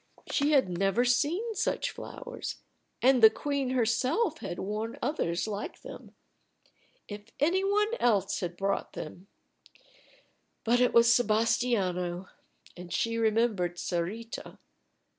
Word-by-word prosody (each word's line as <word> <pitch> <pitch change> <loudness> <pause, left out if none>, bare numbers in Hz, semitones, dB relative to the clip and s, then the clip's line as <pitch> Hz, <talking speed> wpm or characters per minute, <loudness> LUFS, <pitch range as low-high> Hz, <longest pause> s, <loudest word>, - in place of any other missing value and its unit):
She 290 +1 +2
had 270 -8 +4
never 195 +7 +1
seen 315 - +1
such 450 +3 -1
flowers. - - -7 0.5
And 255 -1 +5
the 220 - +10
queen 280 +1 -2
herself 260 - +1
had 175 - -5
worn 215 +4 -4
others 220 - -1
like 210 -1 -5
them. - - -11 0.9
If 205 0 -8
any 350 +6 +2
one 420 +3 +1
else 200 -5 +2
had 175 -1 -4
brought 195 +1 -2
them 175 +5 -8 1.4
but 240 +2 +3
it 250 - +4
was 235 0 +6
Sebastiano. 200 -6 +1 0.5
And 175 0 -10
she 230 +4 0
remembered 215 -6 +1
Sarita. 190 +8 -4
230 Hz, 120 wpm, -29 LUFS, 195-265 Hz, 1.4 s, the